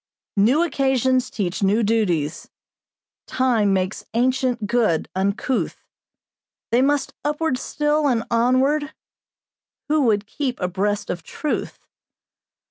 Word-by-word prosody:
"'New 240 Hz, +11 st, +4 dB
occasions 265 Hz, -4 st, +1 dB
teach 185 Hz, -3 st, -3 dB
new 205 Hz, +4 st, +2 dB
duties, 180 Hz, -9 st, 0 dB, 0.8 s
Time 235 Hz, -6 st, +2 dB
makes 190 Hz, +1 st, -1 dB
ancient 250 Hz, -2 st, +1 dB
good 210 Hz, -7 st, +1 dB
uncouth, 200 Hz, +7 st, -1 dB, 0.9 s
They 240 Hz, +2 st, +4 dB
must 285 Hz, +1 st, +1 dB
upward 295 Hz, -2 st, -1 dB
still 295 Hz, 0 st, 0 dB
and 235 Hz, -4 st, +1 dB
onward, 265 Hz, +6 st, +2 dB, 0.9 s
Who 305 Hz, 0 st, +3 dB
would 210 Hz, -3 st, +2 dB
keep 255 Hz, +3 st, -3 dB
abreast 200 Hz, +3 st, -1 dB
of 175 Hz, -1 st, -5 dB
truth. 300 Hz, -, -4 dB
240 Hz, 105 wpm, -22 LUFS, 205-270 Hz, 0.9 s, New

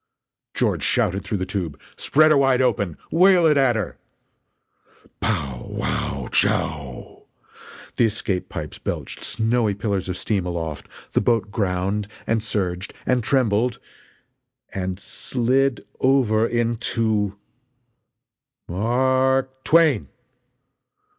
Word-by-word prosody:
George -, -, +1 dB
shouted 95 Hz, +2 st, +1 dB
through 105 Hz, -, -2 dB
the 95 Hz, -, -2 dB
tube: 90 Hz, -7 st, -4 dB, 0.2 s
"Spread 155 Hz, +2 st, +4 dB
her 150 Hz, -, +5 dB
wide 135 Hz, -2 st, +3 dB
open! 100 Hz, -10 st, +1 dB
Whale 180 Hz, 0 st, +5 dB
it 155 Hz, -2 st, +5 dB
at 135 Hz, -4 st, +3 dB
her!" 110 Hz, -5 st, -3 dB, 1.2 s
Pow 70 Hz, -, -2 dB
wow -, -, -2 dB
chow! 70 Hz, -7 st, -1 dB, 0.7 s
The 120 Hz, -, +5 dB
escape 100 Hz, -4 st, -2 dB
pipes -, -, -6 dB
belched -, -, -5 dB
snowy 115 Hz, -2 st, +1 dB
pillars 100 Hz, -3 st, -2 dB
of 90 Hz, -, -2 dB
steam 100 Hz, 0 st, -1 dB
aloft, 80 Hz, -4 st, -4 dB, 0.2 s
the -, -, +2 dB
boat 115 Hz, -4 st, +1 dB
ground 100 Hz, 0 st, -1 dB, 0.2 s
and 115 Hz, -1 st, +1 dB
surged 95 Hz, -4 st, -3 dB
and 125 Hz, -2 st, +1 dB
trembled 120 Hz, -2 st, +1 dB, 1.0 s
and 95 Hz, -1 st, -3 dB
slid 130 Hz, +4 st, 0 dB
over 120 Hz, -5 st, +3 dB
into 115 Hz, -3 st, 0 dB, 1.3 s
"M -, -, -7 dB
a -, -, -4 dB
r 130 Hz, +3 st, +2 dB
k 130 Hz, -, -24 dB
twain!" 165 Hz, 0 st, +4 dB
110 Hz, 115 wpm, -22 LUFS, 95-130 Hz, 1.3 s, her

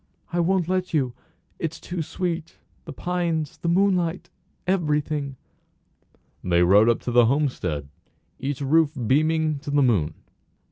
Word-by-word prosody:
"I 175 Hz, -, +1 dB
won't 180 Hz, 0 st, +2 dB
let 185 Hz, -2 st, -1 dB
you. 130 Hz, -5 st, +1 dB, 0.5 s
It's 160 Hz, -1 st, -3 dB
too 175 Hz, -1 st, -4 dB
sweet 170 Hz, 0 st, -4 dB, 0.3 s
the -, -, -7 dB
pines 170 Hz, -4 st, -2 dB
the -, -, -4 dB
moonlight 180 Hz, -1 st, +1 dB, 0.3 s
everything." 150 Hz, -6 st, 0 dB, 1.1 s
They 90 Hz, -1 st, +3 dB
rode 100 Hz, +6 st, +6 dB
up 115 Hz, -, +1 dB
to 125 Hz, -, -3 dB
the 120 Hz, -1 st, +5 dB
homestead, 125 Hz, -, 0 dB
with 70 Hz, -, -20 dB, 0.5 s
each 135 Hz, +1 st, -3 dB
roof 155 Hz, +2 st, +3 dB
beaming 155 Hz, +3 st, +2 dB
to 145 Hz, -, -8 dB
the 145 Hz, 0 st, +3 dB
moon. 90 Hz, -, +1 dB
150 Hz, 140 wpm, -24 LUFS, 130-170 Hz, 1.1 s, rode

